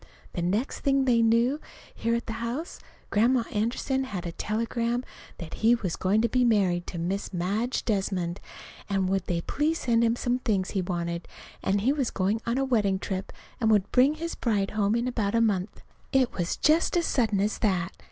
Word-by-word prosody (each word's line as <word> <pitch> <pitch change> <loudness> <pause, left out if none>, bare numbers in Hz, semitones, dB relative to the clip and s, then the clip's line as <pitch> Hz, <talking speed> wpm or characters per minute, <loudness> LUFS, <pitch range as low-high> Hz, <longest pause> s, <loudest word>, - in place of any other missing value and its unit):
The 175 - -3
next 205 +10 -1
thing 275 -1 +2
they 240 -3 +4
knew 230 +5 +3 0.3
here 230 +1 0
at 235 - -3
the 225 - -4
house, 255 +9 -4 0.3
Grandma 235 +3 +3
Anderson 245 +5 0
had 190 -8 -5
a 170 - -3
telegram 230 +5 -1 0.3
that 165 -2 -8
he 230 +2 +6
was 190 -8 -3
going 205 +4 +1
to - - +4
be 250 +2 +2
married 190 -7 +2
to 175 - -6
Miss 185 +4 -2
Madge 205 +7 -1
Desmond, 190 -5 -1 0.5
and 195 -2 +1
would 195 -1 0
they 170 -1 0
please 305 - 0
send 235 -5 +2
him 230 0 +3
some 245 +1 0
things 205 -7 0
he 195 - 0
wanted, 170 -1 -3 0.3
and 195 +1 +1
he 260 +7 +3
was 275 -5 0
going 200 +4 0
on 235 +2 +1
a 270 - +1
wedding 210 -7 +2
trip 190 0 -4 0.3
and 225 -3 +2
would 205 -3 +3
bring 265 +4 +4
his 335 +2 -4
bride 205 -5 0
home 210 0 +1
in 235 +1 0
about 225 -4 -1
a - - +4
month. 205 -4 0 0.3
It 265 -3 +2
was 175 -1 -2
just 320 +3 +3
as 340 - +1
sudden 220 -7 +1
as 210 +2 0
that. 185 -3 +1
220 Hz, 200 wpm, -27 LUFS, 190-245 Hz, 0.5 s, he